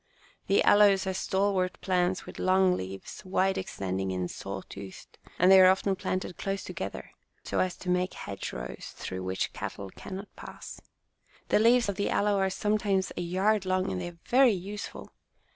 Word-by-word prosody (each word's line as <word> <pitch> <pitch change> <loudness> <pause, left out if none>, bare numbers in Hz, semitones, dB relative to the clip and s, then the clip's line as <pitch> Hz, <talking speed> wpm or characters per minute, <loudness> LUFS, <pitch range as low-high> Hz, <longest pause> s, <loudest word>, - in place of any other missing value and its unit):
The 200 - +4
aloes 205 -2 +5
are 190 - -1
stalwart 190 -1 0
plants 180 -1 0
with - - -10
long 185 0 +4
leaves, 95 - -7
wide 190 +1 +1
extending 95 - -3
and 90 -1 -2
saw - - -6
toothed, 95 -1 -11 0.2
and 180 +2 +5
they 190 0 +9
are 185 - +8
often 190 +1 +2
planted 185 -1 -3
close 195 0 -2
together 100 - -6 0.3
so - - -2
as 185 -1 +1
to 180 - -6
make 180 +1 0
hedgerows 65 -11 -6
through 95 0 -5
which 95 0 -2
cattle 100 -1 -6
can 190 - -8
not 200 +2 -9
pass. - - -10 0.7
The - - +4
leaves 235 +2 +5
of 200 -2 -2
the 200 - 0
aloe 205 -1 +2
are 190 0 +2
sometimes 200 -1 0
a - - -3
yard 190 +4 +1
long, 185 0 0
and 185 - -3
they 175 - -4
are 175 -1 -10
very 255 -2 +5
useful. 200 +3 -6
185 Hz, 175 wpm, -29 LUFS, 175-195 Hz, 0.7 s, they